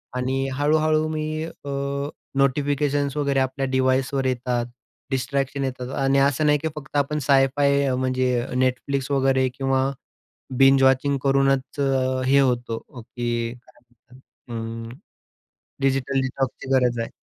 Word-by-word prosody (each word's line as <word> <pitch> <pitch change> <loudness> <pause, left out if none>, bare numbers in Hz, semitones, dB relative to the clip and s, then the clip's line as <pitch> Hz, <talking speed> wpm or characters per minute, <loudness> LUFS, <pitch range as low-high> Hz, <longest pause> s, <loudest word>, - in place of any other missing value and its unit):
आणि 130 +1 -1
हळू-हळू 155 +2 +2
मी 155 0 -3
अ, 145 -3 -10 0.7
नोटिफिकेशन्स 145 +1 +1
वगैरे 140 -2 +1
आपल्या 130 +1 -1
डिवाइसवर 130 +1 +1
येतात, 125 -1 -1 0.5
डिस्ट्रॅक्शन 140 +1 -1
येतात. 125 -1 -5
आणि 135 +1 +3
असं 145 +2 0
नाही, 150 0 +4
की 160 - -2
फक्त 150 0 -5
आपण 145 +2 0
साय-फाय 140 0 +3
म्हणजे 130 -1 0 0.2
Netflix 135 +2 -1
वगैरे 130 -1 +2
किंवा 135 0 +1 0.7
बिंज 135 0 +6
वॉचिंग 135 +1 +3
करूनच 135 0 +1 0.5
हे 140 +2 +5
होतो, 120 -3 0 0.2
की 120 0 -3
काय 125 +1 -21
म्हणतात 115 -1 -10
अ, - - -21 0.8
डिजिटल 135 0 +1
डिटॉक्सची 130 0 -3
गरज 125 -2 +2
आहे. 115 - -3
135 Hz, 120 wpm, -23 LUFS, 125-140 Hz, 0.8 s, बिंज